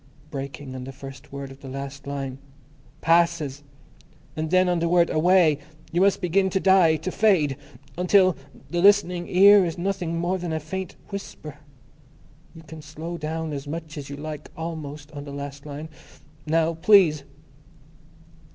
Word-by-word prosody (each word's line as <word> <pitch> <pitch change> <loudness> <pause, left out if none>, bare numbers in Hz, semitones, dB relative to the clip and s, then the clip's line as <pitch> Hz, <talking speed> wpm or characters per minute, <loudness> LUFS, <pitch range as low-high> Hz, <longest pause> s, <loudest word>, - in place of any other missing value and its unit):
_ - - -26
Breaking 140 -1 -6
on 130 -1 -6
the 135 - -7
first 135 +1 -11
word 140 -1 -7
of 135 +1 -14
the 135 - -10
last 140 +1 -7
line, 135 -2 -4 0.6
Passes. 165 -4 +2 0.7
And 155 0 -3
then 185 +1 +4
on 175 -1 +1
the 170 0 0
word, 175 -1 +3
Away, 160 -2 +4 0.3
you 175 +3 +1
must 200 +1 +3
begin 190 +2 +2
to 190 - 0
die... 190 -4 +5
to 160 +4 -4
fade... 175 -12 +3 0.4
until 185 -1 +4 0.4
The 175 0 0
Listening 180 -3 +4
Ear 200 +2 +7
is 165 -2 -3
nothing 175 -2 -2
more 175 +2 -1
than 175 -2 -3
a 160 - -1
faint 185 +4 -6
whisper.... 155 -7 -8 1.0
You 165 - -12
can 160 0 -10
slow 160 +3 -7
down 160 0 -3
as 140 0 -6
much 160 +1 -6
as 145 -3 -7
you 140 - -6
like 150 0 -7
almost 155 -2 -6
on 145 -1 -7
the 145 - -9
last 140 0 -7
line. 145 +2 -6 0.6
Now, 165 +1 +2
please." 165 -4 +5
160 Hz, 165 wpm, -24 LUFS, 145-180 Hz, 1.0 s, Ear